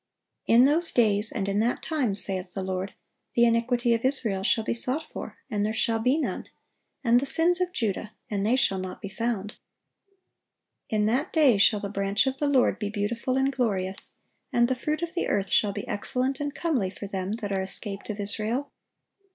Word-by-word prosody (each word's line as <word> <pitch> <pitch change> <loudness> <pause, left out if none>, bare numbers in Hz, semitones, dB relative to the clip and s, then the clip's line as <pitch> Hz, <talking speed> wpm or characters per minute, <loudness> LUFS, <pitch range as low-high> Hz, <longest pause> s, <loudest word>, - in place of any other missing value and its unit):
"In 240 +3 +6
those 325 +4 +3
days, 215 -2 +2
and 200 -4 -2
in 200 +1 0
that 235 +3 0
time, 270 -11 0
saith 185 -2 -3
the 195 - -2
Lord, 190 +1 -3 0.4
the 235 - +5
iniquity 235 +1 +2
of 230 - -1
Israel 240 -8 +2
shall 220 +3 +2
be - - -1
sought 255 +6 +1
for, - - -7
and 210 -6 -1
there 215 +1 -1
shall 225 0 +1
be 250 +6 +2
none; 320 - -2 0.6
and 240 -1 +5
the 275 - -3
sins 345 +5 +2
of 360 0 0
Judah, 215 - -2 0.2
and 200 -2 -2
they 225 +4 +3
shall 195 -7 +1
not 185 0 -6
be 200 - -6
found."(864) 210 0 -3 1.3
"In 210 -1 +1
that 255 - 0
day 275 -10 +4
shall 205 +1 +4
the 200 - -3
branch 200 +3 +1
of 265 0 -1
the 290 - 0
Lord 270 -3 +3
be 205 - -2
beautiful 230 +5 -1
and 270 +1 +1
glorious, 195 -7 -2 0.4
and 240 0 +3
the 260 - +1
fruit 305 +5 -2
of 335 - -4
the 350 - -1
earth 195 -1 0
shall 205 - +3
be - - -6
excellent 255 +5 -1
and 290 -1 -3
comely 270 - 0
for 195 +2 -8
them 195 0 -3
that 215 -3 -4
are 195 -1 0
escaped 195 +2 -6
of 210 -1 -4
Israel. 215 +7 -2
225 Hz, 200 wpm, -26 LUFS, 200-260 Hz, 1.3 s, In